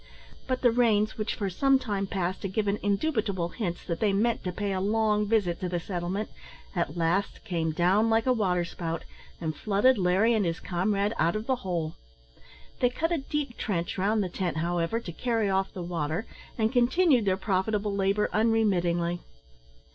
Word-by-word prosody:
But 255 -1 -1
the 240 - +6
rains, 220 -3 +2
which 215 0 -2
for 200 - -2
some 270 +9 +3
time 205 -6 -2
past 185 -1 -2
had 195 -1 -4
given 205 -1 0
indubitable 200 - 0
hints 175 -4 -4
that 170 -1 -3
they 210 -3 +2
meant 225 +4 +1
to 180 - -1
pay 200 +2 -2
a 185 - -1
long 210 0 +2
visit 200 -6 +1
to 180 - -2
the 175 0 -1
settlement, 180 +4 -3 0.4
at 175 0 -1
last 175 +4 0
came 165 -5 -1
down 185 +7 +3
like 225 0 +2
a 255 - +4
waterspout, 175 -5 -1 0.4
and 160 -2 -3
flooded 215 +4 +3
Larry 190 +6 +3
and 220 -2 +2
his 165 -2 -1
comrade 200 +3 0
out 170 +4 +2
of 215 +1 -3
the 260 0 +1
hole. 170 -7 -3 0.8
They 245 - +4
cut 325 +7 -2
a 335 - +1
deep 275 -2 -3
trench 175 -6 -2
round 210 +2 +2
the 185 - -3
tent, 175 -2 -2
however, 170 +6 0
to 190 - -7
carry 225 +1 0
off 190 0 0
the 180 - -6
water, 170 +3 -2 0.3
and 220 0 +1
continued 255 - +4
their 190 -1 +2
profitable 200 +2 0
labour 200 +1 +2
unremittingly. 180 -6 +2
200 Hz, 180 wpm, -28 LUFS, 175-225 Hz, 0.8 s, the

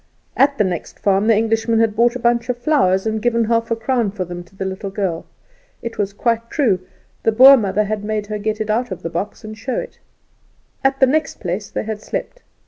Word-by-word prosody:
At 280 +1 +3
the - - +3
next 180 -4 -4
farm 200 +1 +1
the 225 -2 +5
Englishman 225 +1 +1
had 225 -2 +2
bought 240 +2 +3
a - - -3
bunch 235 0 +1
of 250 - 0
flowers, 240 -9 +2
and 220 0 -1
given 235 0 +2
half 230 0 0
a 230 - +1
crown 230 -1 0
for 190 -2 -4
them 175 0 -7
to 185 - -23
the 190 - -4
little 190 +1 -4
girl. 190 -4 -3 0.6
It 230 -2 -6
was 200 -1 0
quite 230 +2 -1
true; 230 - +2 0.4
the 225 - +2
Boer 260 +5 +9
mother 210 -3 0 0.2
made 210 0 -2
her 210 0 -4
get 215 +1 -2
it 215 0 -1
out 240 +3 0
of 185 - -7
the 165 - -4
box 205 +5 -4
and 215 0 -7
show 245 +4 -4
it. - - -6 0.8
At 270 0 +2
the 265 - +7
next 305 +4 0
place 190 +2 -4
they - - -3
had 215 -1 -5
slept. - - -5
220 Hz, 225 wpm, -19 LUFS, 200-235 Hz, 0.8 s, Boer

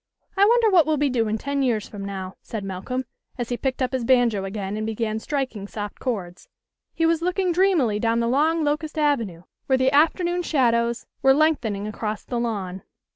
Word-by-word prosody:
" - - -42
I 400 0 +5
wonder 460 0 +4
what 340 -5 +5
we'll 310 -1 +2
be 285 -1 +1
doing 225 -3 0
ten 280 +4 -2
years 235 -5 0
from 205 -2 -8
now," 190 -1 -5
said 220 -3 -6
Malcolm, 195 +7 -4 0.3
as 240 -2 -3
he 245 - 0
picked 260 0 -1
up 250 - -1
his 260 -2 -1
banjo 235 -5 +3
again 195 0 -4
and 215 - -3
began 220 0 -2
striking 255 -6 -3
soft 205 0 -6
chords. 185 -8 -4 0.5
He 330 - +1
was 330 0 +2
looking 360 +1 0
dreamily 335 - +2
down 230 +1 +1
the 235 - +1
long 310 +6 +2
locust 300 +1 -2
avenue 235 - 0 0.2
where 265 - +3
the 260 0 +2
afternoon 345 +4 +2
shadows 235 -7 +1 0.2
were 270 0 +5
lengthening 255 -10 +1
across 215 0 -4
the 240 - -3
lawn. 195 -6 -3
245 Hz, 195 wpm, -24 LUFS, 215-300 Hz, 0.5 s, I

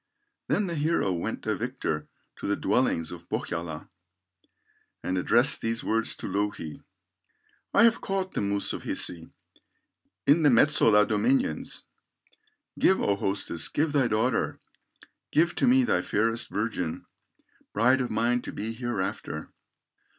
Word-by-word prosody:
Then 205 - +1
the 175 - -3
hero 150 - +1
went 85 - -4
a - - 0
victor 75 -1 -3 0.3
To - - -5
the 100 - +1
dwellings 90 -12 0
of 85 -1 -10
Pohyola, 80 -2 -4 1.2
And 90 - -1
addressed 120 +8 +4
these 115 0 -1
words 115 0 0
to - - -6
Louhi: 100 -6 -3 0.9
"I - - +5
have 230 -1 +4
caught 190 -1 -2
the - - -1
moose 100 0 -1
of - - -5
Hisi, 85 -2 -2 1.0
In 150 +4 +5
the 150 - +5
Metsola 115 -5 +5
dominions, 265 +2 0 1.0
Give, 190 - +4
O 100 - +1
hostess, 95 -4 -1
give 150 +1 0
thy 140 -4 +2
daughter, 115 +2 0 0.7
Give 170 +3 +3
to - - +1
me 260 +1 +5
thy 245 - +1
fairest 115 +2 0
virgin, 100 -6 -3 0.7
Bride 125 +5 +3
of 125 - -2
mine 120 +3 +1
to - - -7
be 110 +2 -4
hereafter." 110 -9 -4
115 Hz, 135 wpm, -27 LUFS, 100-145 Hz, 1.2 s, I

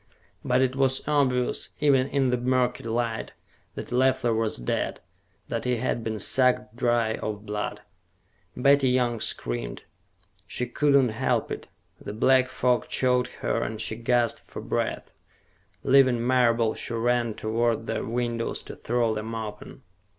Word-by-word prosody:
But 125 +1 +2
it 130 0 0
was 135 0 +1
obvious, 130 -4 +1
even 135 -3 +3
in 135 -3 +1
the 125 - +2
murky 125 0 +1
light, 115 0 -2 0.4
that - - -7
Leffler 130 -1 +2
was 110 -1 -1
dead, - - -2 0.5
that - - -3
he 125 0 +1
had 115 0 -2
been 110 -1 -3
sucked 125 0 +2
dry 120 -2 +1
of 105 0 -5
blood. 105 0 -4 0.8
Betty 140 +1 +4
Young 125 -2 +1
screamed. - - -4 0.6
She 125 - -2
could 145 +2 +2
not 130 -5 +4
help 115 - 0
it. - - -5 0.4
The 100 - -6
black 130 +3 +3
fog 125 -1 +1
choked 125 -1 +1 0.2
her - - 0
and 110 -1 -3
she 110 - -1
gasped 120 0 +1
for - - -10
breath. - - -3 0.7
Leaving 130 -3 +4
Marable, 120 -3 +3
she 115 - -5
ran 120 -1 +1
toward 115 +1 0
the - - -2
windows 120 0 -2
to - - -9
throw 115 -1 0
them 110 +1 -4
open. 110 -2 -7
120 Hz, 150 wpm, -26 LUFS, 115-130 Hz, 0.8 s, Betty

